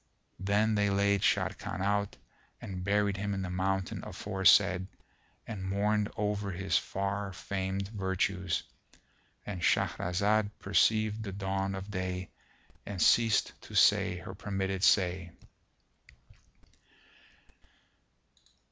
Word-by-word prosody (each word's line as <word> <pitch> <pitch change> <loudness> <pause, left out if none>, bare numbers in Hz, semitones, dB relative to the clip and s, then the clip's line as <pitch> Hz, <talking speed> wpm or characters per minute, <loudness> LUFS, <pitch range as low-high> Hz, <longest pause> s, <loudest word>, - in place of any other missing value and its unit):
Then 105 +3 +2
they 105 -1 +2
laid 100 0 +2
Sharrkan 85 - 0
out 100 +1 0 0.4
and 90 -2 -6
buried 100 0 +1
him 100 0 -2
in 95 - -3
the 90 - -4
mountain 95 +1 -1
aforesaid 95 -1 +3 0.6
and 105 -4 -6
mourned 105 +1 +1
over 105 -1 -1
his 95 +1 -2
far 100 +1 -1
famed 95 +1 -3
virtues.—And 95 -1 -4
Shahrazad 100 +6 +1
perceived 110 +2 +2
the 105 -3 -5
dawn 95 0 -2
of 95 +2 -7
day 90 -1 -4 0.5
and 100 -3 -6
ceased 115 +4 +4
to - - -11
say 90 - +4
her 90 +1 -8
permitted 95 -2 -3
say. 90 -4 +2
100 Hz, 105 wpm, -30 LUFS, 95-100 Hz, 0.6 s, ceased